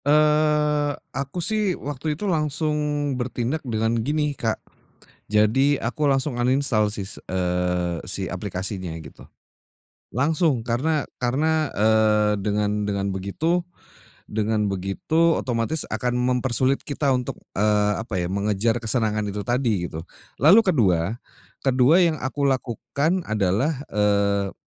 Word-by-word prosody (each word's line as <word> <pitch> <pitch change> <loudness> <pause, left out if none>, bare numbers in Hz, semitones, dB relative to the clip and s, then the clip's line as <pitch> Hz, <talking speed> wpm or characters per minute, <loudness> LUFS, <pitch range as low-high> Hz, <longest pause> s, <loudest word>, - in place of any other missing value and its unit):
Eee, 150 -1 +3 0.2
aku 140 +6 -2
sih, 210 -2 0
waktu 145 +2 -4
itu 210 - -4
langsung 155 -4 0 0.5
bertindak 125 +4 -2
dengan 115 -2 -1
gini, 150 +3 0
Kak. 115 -5 -1 0.7
Jadi 130 +7 +3
aku 120 +6 -3
langsung 135 -1 +2
uninstall 120 -4 +2
sis 100 -1 -4 0.2
eee, 90 -1 -1
si - - -2
aplikasinya, 95 -1 -4
gitu. 75 -3 -12 0.9
Langsung, 145 -2 +1
karena 140 +5 0 0.2
karena, 155 +5 +1
eee, 105 -1 +3
dengan 105 0 0
dengan 100 -1 -1
begitu 150 - -1 0.7
dengan 105 -1 0
begitu, 100 - +1
otomatis 120 +5 -1
akan 125 -1 -1
mempersulit 125 +1 +1
kita 145 0 -2
untuk 125 -1 -5 0.2
eee, 105 0 +2
apa 110 -5 -3
ya, 85 - -2
mengejar 105 +4 0
kesenangan 110 -2 0
itu 105 - -4
tadi, 115 -6 0
gitu. 80 +1 -7 0.4
Lalu 190 +9 +8
kedua 110 - +2 0.5
kedua 135 +7 +5
yang 160 -3 0
aku 140 +2 -2
lakukan 140 - -1
adalah, 110 - 0
eee, 100 -2 +1
120 Hz, 120 wpm, -23 LUFS, 105-145 Hz, 0.9 s, Lalu